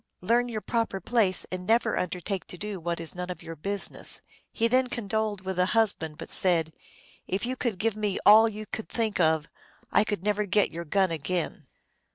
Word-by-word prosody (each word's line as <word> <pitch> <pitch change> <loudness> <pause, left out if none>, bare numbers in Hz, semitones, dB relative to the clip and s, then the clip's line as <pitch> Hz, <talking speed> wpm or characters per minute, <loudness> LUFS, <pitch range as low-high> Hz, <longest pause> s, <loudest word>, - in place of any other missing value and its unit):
Learn 240 +6 +2
your 220 -2 -3
proper 230 -4 -1
place, 200 -2 +1
and 180 0 -5
never 230 +2 +3
undertake 180 +2 -3
to 180 - -7
do 205 0 -5
what 170 0 -2
is 165 -1 -1
none 180 0 -5
of 180 - -6
your 165 - -7
business." 200 +6 0 0.3
He 230 - +1
then 255 +2 +3
condoled 215 -3 -2
with 190 -1 -4
the 180 0 +3
husband, 165 -9 +1
but - - -8
said, 165 -4 +1 0.3
" - - -26
If 190 +5 -1
you 255 +1 -2
could 240 -6 -2
give 220 +3 0
me 210 -2 -1
all 220 +2 +8
you 215 0 -7
could 220 +1 -6
think 220 -4 -1
of, 160 -2 +3 0.4
I - - +5
could 205 -4 -3
never 210 0 +1
get 205 +1 +3
your 170 +1 -6
gun 190 +2 +2
again." 165 -1 -3
195 Hz, 205 wpm, -27 LUFS, 180-220 Hz, 0.4 s, all